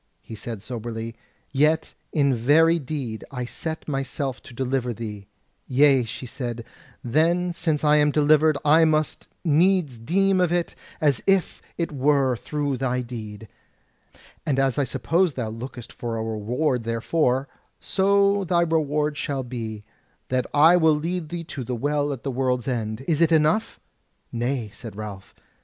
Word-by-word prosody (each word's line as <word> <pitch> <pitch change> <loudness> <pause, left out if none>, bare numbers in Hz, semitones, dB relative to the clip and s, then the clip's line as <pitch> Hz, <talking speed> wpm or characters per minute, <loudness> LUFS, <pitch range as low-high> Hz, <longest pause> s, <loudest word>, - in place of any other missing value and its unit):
He - - -10
said 110 -1 -6
soberly: 115 0 -5 0.4
"Yet 155 +3 +2 0.2
in 140 -3 +2
very 160 +8 +4
deed 130 -6 -5
I 125 -2 -4
set 160 +6 -5
myself 135 -2 -3
to - - -13
deliver 125 -1 -1
thee." 105 -3 -7 0.4
"Yea," 135 -1 +4
she 120 - -7
said, 120 -2 -5 0.4
"then 170 +7 +2
since 160 -3 0
I 150 0 +5
am 150 0 +4
delivered, 150 +1 +4
I 155 +3 +6
must 155 -1 +1 0.2
needs 165 -4 +3
deem 190 +9 +2
of 175 -2 +2
it 175 -1 0 0.3
as 145 -6 +2
if 195 -2 +2 0.2
it 170 -2 -2
were 135 -2 +2
through 145 +2 -2
thy 125 -1 -1
deed. 110 -3 -8 1.0
And 140 -3 0
as 135 0 +1
I 140 - +2
suppose 165 +5 +1
thou 120 -4 -3
lookest 120 +1 -8
for 115 -1 -4
a 110 - -2
reward 120 +5 -1
therefor, 125 +4 0 0.3
so 200 +1 +2
thy 175 -1 +2
reward 150 -2 0
shall 140 -3 -2
be, 115 -4 -6 0.5
that 125 -1 0
I 160 +4 +6
will 160 -3 +4
lead 165 +1 -3
thee 170 0 -4
to 140 -4 -6
the 125 +1 -3
Well 145 +3 0
at 135 -4 -6
the 135 - -2
World's 125 -1 -1
End. 115 -1 -3
Is 160 -1 +1
it 165 -1 +4
enough?" 160 +7 +2 0.5
"Nay," 120 -2 -2
said 115 -5 -9
Ralph. 100 -2 -8
140 Hz, 155 wpm, -24 LUFS, 120-155 Hz, 1.0 s, I